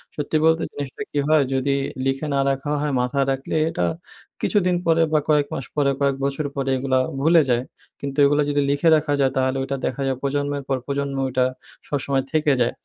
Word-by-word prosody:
সত্যি 150 +1 -1
বলতে 160 0 +3
জিনিসটা 145 +7 -6
কী 145 - 0
হয়? 155 -2 +4
যদি 135 +1 +1 0.3
লিখে 135 +3 -1
না 140 - +1
রাখা 135 +2 -2
হয় 150 -1 -1
মাথায় 135 +2 0
রাখলে 135 +3 -3
এটা 90 - -1 0.6
কিছুদিন 185 -3 +2
পরে 165 0 +3
বা 155 - +5
কয়েক 150 -2 +3
মাস 135 - -4
পরে, 140 -2 +2
কয়েক 140 -1 +2
বছর 140 +2 -2
পরে 135 -1 -2
এগুলা 130 0 +1 0.2
ভুলে 165 +3 +5
যায়, 120 0 +2 0.4
কিন্তু 140 0 -5
এগুলা 145 +1 +3
যদি 145 0 +1
লিখে 145 +4 +3
রাখা 150 -1 0
যায় 135 -1 +3
তাহলে 130 0 +1
ওইটা 135 +1 -3
দেখা 130 +2 -3
যায় 130 -1 -1
প্রজন্মের 145 0 -1
পর 135 - 0
প্রজন্ম 140 0 -2
ওইটা 130 0 +1 0.4
সবসময় 140 -1 -1
থেকে 155 -2 +2
যায়। 120 - +1
140 Hz, 195 wpm, -22 LUFS, 135-150 Hz, 0.6 s, বা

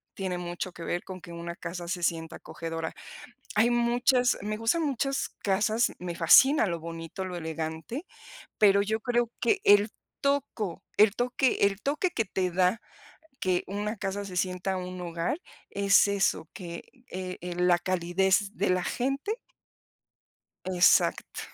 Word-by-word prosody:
tiene 185 -2 -3
mucho 175 +1 -5
que 170 - -9
ver 175 - -2
con 185 -2 -8
que 170 - -11
una 170 0 -6
casa 175 -2 -6
se 175 0 -3
sienta 165 0 -1
acogedora. 165 0 -5 0.6
Hay 225 +3 +4
muchas 245 +1 +3
me 215 +1 -2
gustan 230 +9 +1
muchas 275 0 -1
casas, 215 +4 +2
me 175 -1 -4
fascina 265 - +6
lo 170 -3 -2
bonito, 165 +2 -6
lo 180 -1 -5
elegante 160 - -5 0.5
pero 200 -2 +5
yo 220 +2 -1
creo 240 0 0
que 405 -2 +2
el 205 +1 +6 0.3
toco 280 - -1 0.2
el 210 0 +6
toque 250 +1 +1
el 200 0 -2
toque 300 +6 0
que 225 -10 -1
te 185 -1 -1
da 185 +5 +2 0.6
que 185 -1 +1
una 210 +3 -3
casa 200 0 -3
se 185 -2 -6
sienta 185 +1 -1
un 185 0 -6
hogar 170 - -2 0.3
es 200 +1 +4
eso 195 -5 +1
que, 170 -2 -7 0.3
eh 185 0 -5
eh, 175 0 -5
la 180 -1 +4
calidez 190 +3 +1
de 200 - 0
la 180 -1 +1
gente 275 - -2 1.3
Exacto. 185 -1 +3
190 Hz, 150 wpm, -28 LUFS, 175-225 Hz, 1.3 s, fascina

